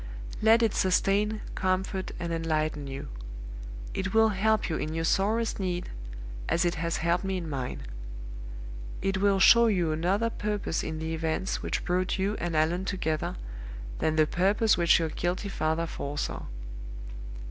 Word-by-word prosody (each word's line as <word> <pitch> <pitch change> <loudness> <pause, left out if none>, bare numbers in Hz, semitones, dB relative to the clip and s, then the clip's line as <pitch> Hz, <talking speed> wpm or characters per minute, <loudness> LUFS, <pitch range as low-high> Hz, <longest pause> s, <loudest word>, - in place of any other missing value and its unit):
Let 225 +2 +6
it 225 - +3
sustain, 205 +3 +2
comfort, 190 0 0
and 170 -1 -2
enlighten 155 -3 0
you. 135 0 -6 0.8
It 195 +2 -2
will 220 0 +6
help 215 +1 +2
you 160 - -1
in 155 +1 -3
your 165 - 0
sorest 210 +7 +2
need, 180 -2 -2 0.6
as 170 - +3
it 175 - +2
has 170 0 -1
helped 170 +2 +2
me 190 -1 -1
in 170 -2 -4
mine. 135 -4 -3 1.2
It 195 -1 +1
will 200 -1 +4
show 235 +4 +8
you 180 -7 +2
another 190 +9 +1
purpose 210 -6 -1
in 160 - -3
the 160 +1 -3
events 160 +3 -1
which - - -2
brought 185 +2 +1
you 195 +2 +1
and 170 -2 -2
Allan 170 +4 +2
together 160 -6 -1 0.6
than 155 - +2
the 155 -1 +5
purpose 200 +7 +3
which 170 -1 +5
your 165 -2 0
guilty 180 +5 -1
father 160 -2 0
foresaw. 145 -2 -3
180 Hz, 155 wpm, -29 LUFS, 160-200 Hz, 1.2 s, show